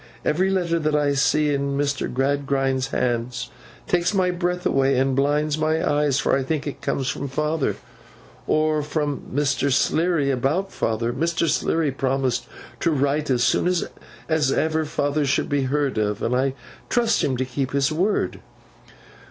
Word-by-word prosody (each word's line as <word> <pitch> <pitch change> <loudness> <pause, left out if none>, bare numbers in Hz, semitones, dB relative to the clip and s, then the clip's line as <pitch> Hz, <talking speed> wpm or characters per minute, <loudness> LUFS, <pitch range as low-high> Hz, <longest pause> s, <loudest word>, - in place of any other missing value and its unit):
Every 185 +5 +2
letter 175 -3 +1
that 155 -1 0
I 145 -1 +2
see 150 +1 +2
in 140 0 -1
Mr. 140 -1 -1
Gradgrind's 135 0 0
hand 120 -2 -1 0.5
takes 175 +2 +1
my 185 -1 +2
breath 180 0 -2
away 135 -1 +2
and 135 0 +2
blinds 150 +2 +1
my 155 +1 +1
eyes, 145 -2 +2
for - - +2
I 135 - +1
think 145 +2 -2
it 145 - -6
comes 135 - -1
from 140 - -2
father, 150 +2 -1 0.7
or 155 0 +2
from 150 -1 -2
Mr. 140 0 +1
Sleary 160 +1 +2
about 150 +10 0
father. 115 +1 -1
Mr. 165 +4 0
Sleary 160 0 +1
promised 130 -2 -1 0.3
to - - +1
write 145 0 0
as 125 -2 +2
soon - - +2 0.6
as 155 -4 +2
ever 160 +2 +1
father 145 0 0
should 140 0 0
be 140 -2 +1
heard 140 -3 0
of, 105 0 -1
and 125 - +1
I 135 +1 +1 0.3
trust 235 -2 +2
to - - +2
him 130 -2 -1
to 130 - -1
keep 130 +1 -3
his 140 +2 +1
word. 185 +7 0
145 Hz, 165 wpm, -23 LUFS, 135-155 Hz, 0.7 s, Every